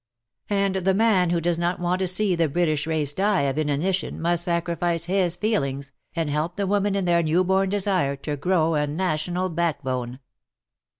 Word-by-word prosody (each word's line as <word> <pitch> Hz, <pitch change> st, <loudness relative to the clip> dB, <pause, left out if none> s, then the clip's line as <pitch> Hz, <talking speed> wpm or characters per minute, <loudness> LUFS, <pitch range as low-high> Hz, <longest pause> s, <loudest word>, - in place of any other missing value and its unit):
And 200 Hz, -1 st, +1 dB
the 190 Hz, 0 st, +1 dB
man 200 Hz, -5 st, +3 dB
who 170 Hz, 0 st, +1 dB
does 170 Hz, 0 st, 0 dB
not 175 Hz, +1 st, -1 dB
want 175 Hz, +1 st, 0 dB
to 190 Hz, -, 0 dB
see 190 Hz, +2 st, +2 dB
the 165 Hz, -2 st, +1 dB
British 155 Hz, -1 st, 0 dB
race 155 Hz, -3 st, 0 dB
die 200 Hz, +3 st, +1 dB
of 140 Hz, +1 st, -1 dB
inanition 155 Hz, +6 st, -1 dB
must 170 Hz, +1 st, +1 dB
sacrifice 170 Hz, -1 st, 0 dB
his 180 Hz, -1 st, +1 dB
feelings, 140 Hz, -9 st, -2 dB, 0.2 s
and 165 Hz, -2 st, -1 dB
help 155 Hz, +4 st, -2 dB
the 200 Hz, -, -1 dB
women 200 Hz, +1 st, +1 dB
in 195 Hz, -2 st, 0 dB
their 170 Hz, -1 st, +3 dB
new 165 Hz, +3 st, +2 dB
born 190 Hz, +1 st, +1 dB
desire 190 Hz, -8 st, 0 dB
to 145 Hz, +2 st, -4 dB
grow 165 Hz, +1 st, +1 dB
a 150 Hz, -1 st, 0 dB
national 175 Hz, +3 st, -2 dB
backbone. 130 Hz, -7 st, -2 dB
175 Hz, 180 wpm, -24 LUFS, 155-190 Hz, 0.2 s, man